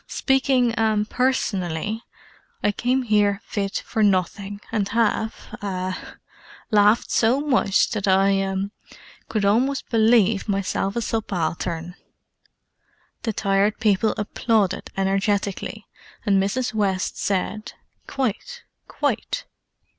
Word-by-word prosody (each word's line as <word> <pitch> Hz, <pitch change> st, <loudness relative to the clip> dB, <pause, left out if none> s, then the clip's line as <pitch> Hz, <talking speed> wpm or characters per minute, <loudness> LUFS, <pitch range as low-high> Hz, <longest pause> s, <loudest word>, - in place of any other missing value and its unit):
Speaking—ah—personally, 225 Hz, -, +1 dB, 0.6 s
I 205 Hz, -, +3 dB
came 250 Hz, +5 st, 0 dB
here 205 Hz, -3 st, +2 dB
fit 200 Hz, -1 st, -3 dB
for 220 Hz, -, -2 dB
nothing, 200 Hz, 0 st, +1 dB
and 210 Hz, -3 st, 0 dB
have—ah—laughed 210 Hz, 0 st, -1 dB
so 235 Hz, +4 st, +3 dB
much 255 Hz, -9 st, +2 dB
that 205 Hz, -3 st, -2 dB
I—ah—could 195 Hz, +2 st, -1 dB
almost 255 Hz, +7 st, +1 dB
believe 220 Hz, -2 st, +3 dB
myself 195 Hz, 0 st, -1 dB
a 235 Hz, -, -1 dB
subaltern!" 175 Hz, -5 st, -2 dB, 1.3 s
The 225 Hz, -, -1 dB
Tired 200 Hz, +1 st, +1 dB
People 210 Hz, 0 st, +2 dB
applauded 210 Hz, -1 st, 0 dB
energetically, 195 Hz, 0 st, -1 dB, 0.4 s
and 195 Hz, -2 st, +3 dB
Mrs. 225 Hz, +6 st, -1 dB
West 200 Hz, -3 st, -1 dB
said 205 Hz, +2 st, -2 dB, 0.3 s
"Quite—quite!" 375 Hz, -, -3 dB
205 Hz, 85 wpm, -23 LUFS, 195-225 Hz, 1.3 s, I